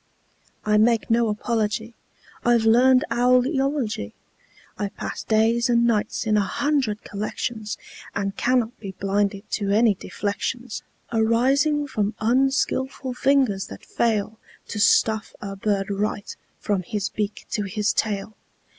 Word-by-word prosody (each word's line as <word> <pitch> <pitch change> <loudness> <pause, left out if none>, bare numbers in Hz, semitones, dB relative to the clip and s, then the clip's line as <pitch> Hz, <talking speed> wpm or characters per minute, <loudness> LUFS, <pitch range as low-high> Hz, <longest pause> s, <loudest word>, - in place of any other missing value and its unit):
I 210 0 +3
make 230 0 +2
no 230 0 +3
apology; 220 +1 -1 0.5
I've 235 -2 +3
learned 255 +3 +5
owl 250 +1 +4
eology. 270 - -1 0.6
I've 200 -1 -4
passed - - -5
days 230 +3 +3
and 235 0 +4
nights 220 0 0
in 215 -1 +2
a - - +4
hundred 255 0 0
collections, 215 +1 -4 0.4
And 195 0 -2
cannot 245 0 0
be 195 -3 -7
blinded 200 +1 -1
to 200 -2 -1
any 215 +2 +4
deflections 210 +5 -4 0.3
Arising 265 +7 +2
from 215 -6 -2
unskilful 265 +2 +1
fingers 255 -7 +2
that - - -11
fail 220 -1 -1 0.3
To 210 - -4
stuff 220 0 +3
a 195 -1 -6
bird 195 0 -1
right, 205 +1 -2 0.2
from 200 -3 0
his 200 +2 -3
beak 210 -1 -4
to 210 - 0
his 210 +2 0
tail. 210 0 -2
220 Hz, 130 wpm, -24 LUFS, 205-245 Hz, 0.6 s, learned